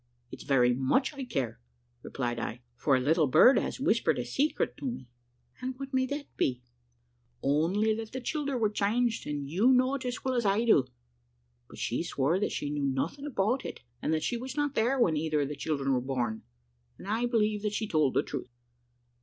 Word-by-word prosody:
"`It's - - -8
very 125 -3 +3
much 135 - +1
I 275 -2 -5
care,' 135 - -3 0.4
replied 120 -3 -3
I, 120 +2 -5 0.2
`for 140 -3 +4
a - - +1
little 155 +4 +3
bird 250 - +7
has - - -4
whispered 235 -4 +2
a 125 - -2
secret 280 - 0
to - - -7
me.' 240 - -5 0.5
"`And 255 0 -3
what 275 0 -7
may 260 0 +2
that 285 +2 -4
be?' 125 -1 0
says 120 - -38 0.7
she. - - -1
"`Only 185 +10 +2
that 225 0 -6
the 260 - -4
childer 280 +1 -2
were 215 -3 +1
changed, 225 +2 0
and 145 -1 -3
you 195 - +3
know 255 +1 +4
it 275 - -3
as 245 +1 -4
well 260 - +1
as 240 -2 +1
I 205 +3 +2
do.' 145 - +4 0.8
But - - -12
she 120 - -1
swore 165 +1 0
that 210 - 0
she 145 - -3
knew 145 -1 -2
nothing 145 - -2
about 240 0 0
it, - - -7 0.2
and - - -1
that 155 -1 0
she 240 - -1
was 260 +3 -7
not 290 -1 0
there 250 +4 +1
when 175 -10 +3
either 155 -1 0
of 140 - -1
the 150 - -4
children 140 -2 -1
were 125 - +1
born, 120 -4 -2 0.6
and - - -11
I 225 +4 0
believe 215 -3 +1
that 210 0 -2
she 220 +1 -2
told 155 -7 +2
the - - +3
truth. - - -6
200 Hz, 215 wpm, -29 LUFS, -, 0.8 s, bird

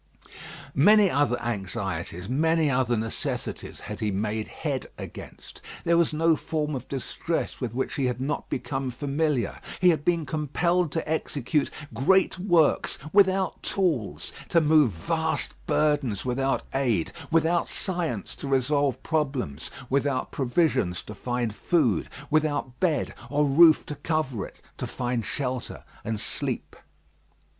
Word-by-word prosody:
Many 205 +6 +6
other 140 -3 +2
anxieties, 95 -5 -3
many 160 +4 +2
other 125 -2 +2
necessities 110 +1 -4
had 105 0 -6
he 110 - 0
made 105 +2 -1
head - - -3
against. - - -10 0.2
There 170 0 +3
was 170 -1 +3
no 160 +1 +3
form 150 -1 -2
of 130 -2 -5
distress 140 +5 -3
with 120 -2 -3
which 130 - -1
he 135 - 0
had 125 -1 -2
not 135 +3 -2
become 135 -1 -2
familiar. 140 -2 -1 0.2
He 180 - +6
had 155 -4 +2
been 170 -2 +1
compelled 160 +3 0
to 165 - -2
execute 150 -2 0 0.2
great 185 +10 +3
works 175 -5 +3 0.2
without 190 -1 +3
tools, 160 - -1 0.2
to 170 - +5
move 150 -5 +5
vast 160 - -1
burdens 145 -9 +1
without 135 +2 0
aid, 120 -11 +1 0.2
without 165 +1 +2
science 170 - -2
to - - -6
resolve 135 0 +1
problems, 135 - -1 0.2
without 140 0 0
provisions 130 - +1
to 105 - -8
find 120 0 -2
food, 120 - +1 0.2
without 150 -5 0
bed 160 -7 +1 0.2
or 145 +1 +2
roof 155 +3 +6
to - - -5
cover 140 -10 -1
it, - - -19 0.2
to - - -3
find 120 -2 -2
shelter 130 -3 -3 0.2
and 110 -1 -2
sleep. - - -3
140 Hz, 135 wpm, -26 LUFS, 120-160 Hz, 0.2 s, Many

